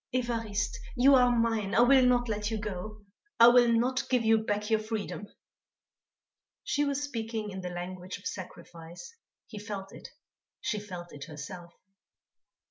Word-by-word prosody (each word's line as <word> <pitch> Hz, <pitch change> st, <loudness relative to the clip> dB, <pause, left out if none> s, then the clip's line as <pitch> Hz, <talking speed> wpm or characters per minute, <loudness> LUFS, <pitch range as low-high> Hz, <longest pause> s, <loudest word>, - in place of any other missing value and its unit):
"Évariste, 230 Hz, -4 st, -1 dB, 0.2 s
you 265 Hz, +3 st, +6 dB
are 250 Hz, -2 st, +6 dB
mine, 225 Hz, -4 st, 0 dB
I -, -, +6 dB
will 260 Hz, +2 st, +6 dB
not 245 Hz, -1 st, +2 dB
let 210 Hz, -1 st, -2 dB
you 225 Hz, -, -2 dB
go; 210 Hz, 0 st, -6 dB, 0.3 s
I 235 Hz, +1 st, +10 dB
will 240 Hz, -1 st, +5 dB
not 250 Hz, +3 st, +1 dB
give 250 Hz, -3 st, +2 dB
you 225 Hz, 0 st, +5 dB
back 210 Hz, 0 st, -2 dB
your 220 Hz, -, +4 dB
freedom." 215 Hz, -1 st, -5 dB, 1.4 s
She 290 Hz, 0 st, 0 dB
was 280 Hz, 0 st, -1 dB
speaking 225 Hz, -5 st, -4 dB
in 190 Hz, 0 st, -6 dB
the 180 Hz, -, -4 dB
language 180 Hz, +1 st, -6 dB
of 200 Hz, -, -18 dB
sacrifice. 175 Hz, -, -8 dB, 0.3 s
He 215 Hz, -, -9 dB
felt 205 Hz, -2 st, -7 dB
it; -, -, -10 dB, 0.5 s
she 215 Hz, -5 st, -2 dB
felt 180 Hz, -4 st, -9 dB
it 145 Hz, -1 st, -8 dB
herself. 170 Hz, +3 st, -9 dB
215 Hz, 155 wpm, -29 LUFS, 190-240 Hz, 1.4 s, I